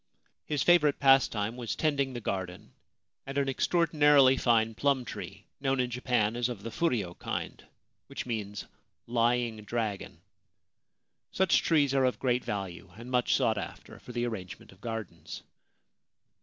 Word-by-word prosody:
His 150 -2 0
favourite 155 -5 +4
pastime 125 -5 +3
was 120 -3 -4
tending 140 -4 0
the 120 - -4
garden 95 -4 -5 0.5
and 135 +1 -5
an 140 -1 +1
extraordinarily 145 -2 +4
fine 115 -3 +2
plum 135 +1 +1
tree - - -8
known 135 -1 0
in 125 -1 0
Japan 120 -3 0
as 120 0 0
of 110 -5 -7
the 115 - -5
furyo 110 - -1
kind - - -5 0.4
(which - - -6
means 105 -4 -4
c - - -14 0.4
lying 120 -1 +1
dragon 105 -2 -4 0.3
' - - -55
). - - -55 0.3
Such 190 -1 +3
trees 145 -4 +2
are 135 -1 +3
of 125 - 0
great 125 -1 0
value, 95 -2 -5
and 120 +2 -9
much 125 -1 +2
sought 110 -2 +1
after - - -9
for - - -11
the 120 0 -1
arrangement 95 -6 -7
of 95 +1 -20
gardens. 110 -9 -6
120 Hz, 155 wpm, -29 LUFS, 110-135 Hz, 0.5 s, favourite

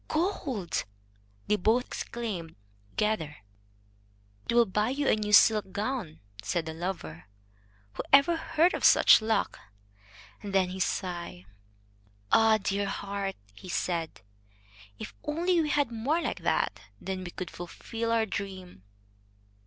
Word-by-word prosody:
"Gold!" 290 - -1 0.6
they 210 - +2
both 225 +6 +2
exclaimed 200 -9 -5 0.3
together. 185 - -1 1.1
"It 235 - +1
will 240 -1 +6
buy 210 +3 0
you 280 +2 -1
a - - +5
new 210 -1 -3
silk 210 -1 +6
gown," 205 -7 -3 0.2
said 170 - -1
the 160 - -5
lover. 165 - -5 0.7
"Who - - -4
ever 280 +5 +6
heard 330 +2 +2
of - - -3
such - - +7
luck?" 220 0 0 0.8
And 200 -1 -5
then 185 -2 +3
he 185 +1 -6
sighed. 175 - -3 0.9
"Ah! 225 -1 +6
dear 200 0 -1
heart," 200 0 -3 0.2
he 185 - -12
said, 170 -2 -2 0.8
"if - - -8
only 340 +3 +1
we 305 - -1
had 285 -4 +1
more 250 +9 0
like - - -3
that! - - 0 0.2
Then 190 -1 -4
we 175 - -6
could 180 0 -6
fulfil 225 +6 -5
our 225 -1 +3
dream." 190 - -6
210 Hz, 135 wpm, -29 LUFS, 180-240 Hz, 1.1 s, such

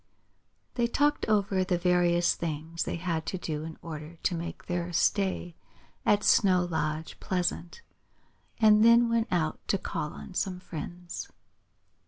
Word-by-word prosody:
They 240 -1 +1
talked 290 +4 +1
over 200 -3 +2
the 180 -1 0
various 175 -1 +3
things 160 +1 -4
they - - -2
had 165 -2 -2
to 185 - -2
do 155 -4 -4
in 160 0 -7
order 155 0 -7
to 185 - +1
make 170 0 -6
their 175 0 -2
stay 185 0 +1 0.5
at 205 0 +4
Snow 185 -3 +4
Lodge 160 -2 -3
pleasant, 180 - -2 0.8
and 215 -1 +6
then 235 +1 +6
went 230 -1 +1
out 165 -4 0
to 195 - +2
call 150 -4 -4
on - - -10
some 180 0 -2
friends. 175 +1 -7
175 Hz, 145 wpm, -29 LUFS, 165-200 Hz, 0.8 s, and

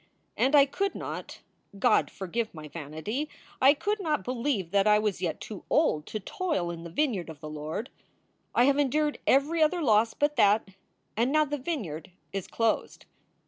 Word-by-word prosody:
And 270 +3 +3
I 280 -1 +8
could 395 +8 -2
not - - -6 0.4
God - - +3
forgive 220 +2 -4
my 155 -1 -8
vanity 160 - -4 0.3
I 275 +3 +7
could 415 +7 -1
not 305 - 0
believe 235 - -2
that 200 +1 +3
I 210 0 +6
was 210 -4 -1
yet 165 -4 -2
too 210 -4 -8
old 155 - +2
to 215 - -4
toil 290 - -2
in 170 -1 -7
the 170 - -7
vineyard 205 - -1
of 155 -2 -9
the 155 - -8
Lord. 155 - -5 0.6
I 240 - +5
have 280 +2 +3
endured 295 +2 +1
every 295 +5 +3
other 330 +2 +3
loss 225 -2 +3
but 290 0 0
that, 210 -1 +4 0.5
and 235 +5 +1
now 305 +1 +4
the 295 0 -3
vineyard 215 - -4 0.2
is 195 -2 -3
closed. 225 -1 -1
230 Hz, 180 wpm, -28 LUFS, 180-295 Hz, 0.6 s, I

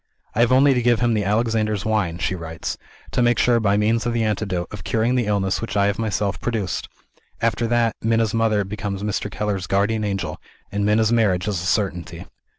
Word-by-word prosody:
"I - - -3
have 120 +1 +4
only 135 +2 +5
to 125 - +1
give 120 -1 +3
him 120 -1 +2
the 105 -2 +1
Alexander's 110 0 0
Wine," 105 -6 0
she 85 - -1
writes, 80 -2 -5 0.4
"to - - +1
make 120 0 +3
sure, 120 -1 +3
by 100 -2 +2
means 110 +2 +2
of 120 - 0
the 115 -1 +1
antidote, 100 -5 -1
of 105 -4 -8
curing 115 +5 +1
the 125 -4 +1
illness 100 -2 0
which 105 -2 -3
I 100 - +4
have 100 +1 0
myself 100 -3 -1
produced. 110 -7 -2 0.5
After 115 0 0
that, 115 -1 +1
Minna's 115 -1 +1
mother 110 -2 +2
becomes 100 0 -4
Mr. 105 0 -2
Keller's 100 -2 -3
guardian 105 +3 +1
angel, 100 -2 -3 0.3
and 100 +1 -1
Minna's 105 +2 +3
marriage 105 -5 +2
is 100 -5 -1
a 85 - -3
certainty." 90 -4 -2
105 Hz, 205 wpm, -22 LUFS, 100-115 Hz, 0.5 s, only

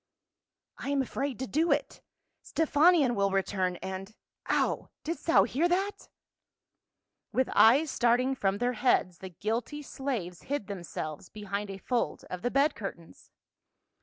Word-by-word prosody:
" - - -62 0.3
I - - -4
am 280 -1 +2
afraid 270 0 -3
to 260 - -3
do 315 +6 +1
it; - - -1 0.4
Stephanion 310 -3 +4
will 200 -2 +2
return, 190 -1 0
and 190 +3 -6 0.2
— - - -21
Ow! - - +1
Didst 330 +2 -5
thou 330 - +6
hear 325 +7 +1
that 385 +3 -1 0.6
?" - - -58
With 260 0 +2
eyes 260 +8 +6
starting 245 +2 +2
from 200 -6 0
their 245 +3 0
heads 210 -7 +1
the 190 - -7
guilty 225 - -3
slaves 235 -12 -4
hid 285 -7 -1
themselves 170 -4 -6
behind 205 -1 -4
a 195 - -6
fold 240 +5 -2
of 180 - -4
the 245 - 0
bed 280 +3 +3
curtains. 175 -5 -9
240 Hz, 155 wpm, -29 LUFS, 195-280 Hz, 0.6 s, thou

